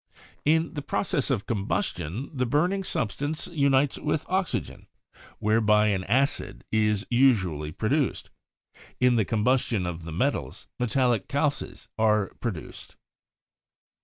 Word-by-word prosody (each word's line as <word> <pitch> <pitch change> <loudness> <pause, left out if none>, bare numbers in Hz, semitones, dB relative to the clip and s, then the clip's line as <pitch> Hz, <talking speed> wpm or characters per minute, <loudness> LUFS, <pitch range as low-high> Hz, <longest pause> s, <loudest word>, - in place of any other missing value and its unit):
2. - - -23 0.3
In 160 +1 +1
the 145 - -4
process 145 -1 -1
of 120 -7 0
combustion 105 - -2
the 130 -3 -1
burning 175 +9 +1
substance 145 - -2
unites 140 -5 +2
with 150 0 -1
oxygen, 185 0 -2 0.5
whereby 105 0 +3
an 95 -2 0
acid 135 +6 0
is 105 -1 +1
usually 95 - +2
produced. 130 - -1 0.7
In 125 -1 +4
the 110 -3 +2
combustion 110 -2 +1
of 85 -1 -4
the 85 - -7
metals, 80 - -2
metallic 125 -1 +1
calces 145 0 -2
are 105 -2 +3
pro 120 - 0
duced. 85 -8 -9
120 Hz, 125 wpm, -26 LUFS, 105-145 Hz, 0.7 s, In